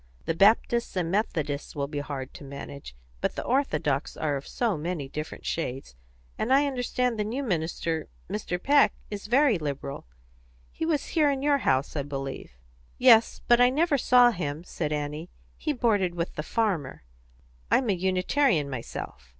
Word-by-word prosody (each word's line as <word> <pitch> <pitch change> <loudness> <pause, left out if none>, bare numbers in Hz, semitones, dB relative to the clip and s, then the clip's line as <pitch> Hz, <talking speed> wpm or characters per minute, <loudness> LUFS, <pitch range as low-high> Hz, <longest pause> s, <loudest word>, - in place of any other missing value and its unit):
The - - 0
Baptists 220 +6 +3
and 175 -2 -1
Methodists 155 -9 -2
will 140 -1 -1
be 145 0 -4
hard 140 -2 -5
to - - -11
manage; 140 - -9 0.2
but - - -1
the - - -3
Orthodox 155 - 0
are 150 -2 0
of 140 - -6
so 230 -5 0
many 155 -2 -3
different 150 +3 -7
shades; 135 - -3 0.5
and 240 - -1
I 275 +2 +5
understand 250 -3 -1
the - - +2
new 240 +7 -3
minister, 165 - -2 0.2
Mr. 195 -2 -3
Peck, 280 +7 +4 0.2
is 205 0 -5
very 250 - +4
liberal. 140 - -5 0.6
He 320 - -3
was 305 -4 0
here 305 -3 +3
in 275 -1 -1
your 285 -1 +3
house, 135 - +1
I 145 - 0
believe." 135 - -6 0.4
"Yes; 235 -3 +5
but 240 0 +6
I 245 - +7
never 295 +1 +2
saw 245 0 +6
him," 155 -5 -4
said 155 -3 -4
Annie. 150 +3 -3 0.3
"He 310 - -2
boarded 210 -9 +1
with 170 0 -3
the - - -3
farmer. 175 - -1 0.7
I'm 260 - +3
a 205 - +3
Unitarian 185 - +1
myself." 65 - -7
180 Hz, 165 wpm, -27 LUFS, 145-245 Hz, 0.7 s, I